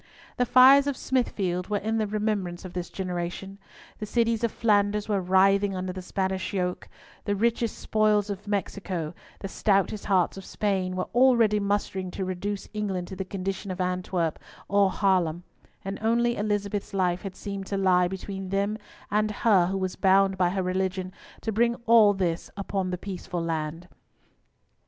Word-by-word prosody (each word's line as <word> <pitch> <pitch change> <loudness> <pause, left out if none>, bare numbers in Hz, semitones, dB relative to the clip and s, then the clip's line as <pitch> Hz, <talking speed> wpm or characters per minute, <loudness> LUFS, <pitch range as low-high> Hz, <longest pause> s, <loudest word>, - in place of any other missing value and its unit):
The 250 - +1
fires 270 +3 +7
of 280 -2 -1
Smithfield 190 -8 -1
were 210 - +1
in 220 +2 -1
the 215 - 0
remembrance 205 -4 -2
of 180 - -8
this 180 -1 -4
generation. 185 +1 -5 0.4
The 210 - -5
cities 230 0 +1
of 230 - +1
Flanders 210 -2 +1
were 205 -3 +1
writhing 195 +2 +3
under 185 0 -3
the 185 - -6
Spanish 190 +1 -2
yoke; 180 -2 -2 0.4
"the 205 - 0
richest 230 +2 0
spoils 215 -1 +1
of 200 +1 -7
Mexico, 195 -5 -3 0.3
the 195 - -4
stoutest 200 +1 0
hearts 190 -2 +2
of 195 - -8
Spain," 190 -2 -1
were 185 - -1
already 235 -4 +4
mustering 200 -2 -1
to 190 - -2
reduce 190 +2 -4
England 195 -4 -3
to 190 - -6
the 190 - -3
condition 195 +1 -4
of 185 - -5
Antwerp 180 -2 -1 0.3
or 200 -1 +3
Haarlem; 180 -4 +1 0.4
and 195 +1 -4
only 235 +2 +2
Elizabeth's 205 -1 -2
life 180 -2 +1
had 195 -2 -7
seemed 200 -2 -6
to 200 - -2
lie 180 -2 +3
between 190 +1 -6
them 200 +3 -1 0.3
and 210 +1 +2
her 205 -4 +3
who 195 +1 -1
was 185 -1 -2
bound 195 0 +4
by 180 -1 +2
her 190 +1 -1
religion 185 0 -2 0.3
to 220 - -2
bring 235 +2 +2
all 220 -3 +6
this 175 -3 -2
upon 195 -1 -2
the 180 - -2
peaceful 180 -2 -5
land. 165 +1 -3
195 Hz, 170 wpm, -26 LUFS, 185-210 Hz, 0.4 s, fires